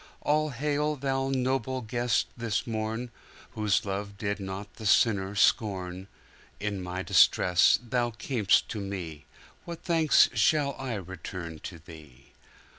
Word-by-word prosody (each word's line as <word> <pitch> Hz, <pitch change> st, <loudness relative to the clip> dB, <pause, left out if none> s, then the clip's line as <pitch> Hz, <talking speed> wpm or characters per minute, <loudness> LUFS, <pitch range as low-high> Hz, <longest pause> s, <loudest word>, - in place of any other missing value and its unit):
All 155 Hz, +1 st, +1 dB
hail, 150 Hz, +3 st, -1 dB
Thou 135 Hz, -1 st, -1 dB
noble 130 Hz, -1 st, -1 dB
Guest, 120 Hz, +1 st, 0 dB
this 115 Hz, -3 st, -2 dB
morn, 115 Hz, +1 st, -3 dB, 0.4 s
Whose 105 Hz, -2 st, 0 dB
love 100 Hz, 0 st, -4 dB
did 100 Hz, 0 st, -2 dB
not 95 Hz, +1 st, -7 dB
the 110 Hz, -, -8 dB
sinner 100 Hz, -2 st, +3 dB
scorn! 95 Hz, -4 st, +1 dB, 0.5 s
In 100 Hz, -2 st, -3 dB
my 90 Hz, +1 st, -4 dB
distress 90 Hz, -2 st, +5 dB
Thou 120 Hz, 0 st, 0 dB
cam'st 115 Hz, -2 st, +1 dB
to 110 Hz, -, -4 dB
me:What 95 Hz, -, -8 dB
thanks 165 Hz, -3 st, +4 dB
shall 140 Hz, +5 st, +2 dB
I 130 Hz, -3 st, -3 dB
return 90 Hz, -3 st, -7 dB
to 85 Hz, -, -8 dB
Thee? 80 Hz, -5 st, -15 dB
110 Hz, 125 wpm, -28 LUFS, 95-130 Hz, 0.5 s, distress